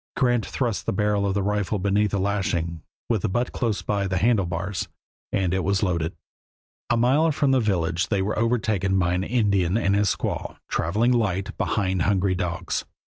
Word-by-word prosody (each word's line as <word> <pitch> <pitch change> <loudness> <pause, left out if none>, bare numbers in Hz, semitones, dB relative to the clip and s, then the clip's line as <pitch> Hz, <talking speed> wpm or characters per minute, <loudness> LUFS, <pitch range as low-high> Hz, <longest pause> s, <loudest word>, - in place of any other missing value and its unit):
Grant 120 -3 +2
thrust 120 -6 -2
the - - +1
barrel 105 0 +1
of 95 - -1
the 100 - +1
rifle 105 0 0
beneath 100 +2 +1
a 100 - 0
lashing, 90 -5 -1 0.3
with 110 -5 +1
the 110 - 0
butt 120 +6 -1
close 115 -5 -1
by 100 -2 0
the 95 0 -1
handle 100 -1 +2
bars, 90 +3 -3 0.4
and 95 -2 0
it 95 -1 0
was 100 +1 +1
loaded. 85 -3 -1 0.7
A 120 - +3
mile 140 +7 +3
from 140 -2 +1
the 130 - +4
village 90 -5 0
they 100 -2 0
were 105 +3 -1
overtaken 110 -5 +1
by 90 -1 +2
an 90 +1 0
Indian 100 -5 +1
and 100 -4 +1
his 100 -1 +2
squaw, - - -4
traveling 105 +9 +1
light 100 -6 0
behind 95 -4 0
hungry 95 0 +2
dogs. 90 -2 -2
100 Hz, 185 wpm, -24 LUFS, 95-110 Hz, 0.7 s, the